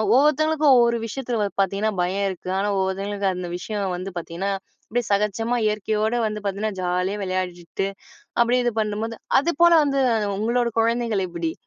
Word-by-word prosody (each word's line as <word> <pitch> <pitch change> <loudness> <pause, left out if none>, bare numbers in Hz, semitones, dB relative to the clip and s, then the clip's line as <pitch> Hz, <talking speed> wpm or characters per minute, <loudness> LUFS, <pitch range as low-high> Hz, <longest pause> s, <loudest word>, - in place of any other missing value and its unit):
ஒவ்வொருத்தவங்களுக்கும் 300 0 +4
ஒவ்வொரு 235 -1 +3
விஷயத்துல 240 0 -3
வ - - +1
பாத்தீங்கன்னா 200 +3 0
பயம் 195 +3 0
இருக்கு, 185 -1 -7
ஆனா 205 +1 0
ஒவ்வொருத்தவங்களுக்கு 195 +1 -1
அந்த 180 -1 -5
விஷயம் 195 -1 -3
வந்து 185 +2 -5
பாத்தீங்கன்னா, 175 +4 -3 0.4
அப்டியே 240 +2 -1
சகஜமா 210 +4 +1
இயற்கையோட 215 +1 0
வந்து 210 0 -4
பாத்தீங்கன்னா, 200 +2 -1
ஜாலியா 180 +3 -1
விளையாடிட்டு, 185 0 -3 0.5
அப்டியே 245 +1 +3
இது 240 - +1
பண்ணும்போது 215 +2 -3 0.2
அது 335 +5 0
போல 345 - +7
வந்து 275 -1 +1 0.4
உங்களோட 235 +3 +1
குழந்தைகள் 230 -4 +1
எப்டி? 170 -2 -3
210 Hz, 150 wpm, -23 LUFS, 190-235 Hz, 0.5 s, போல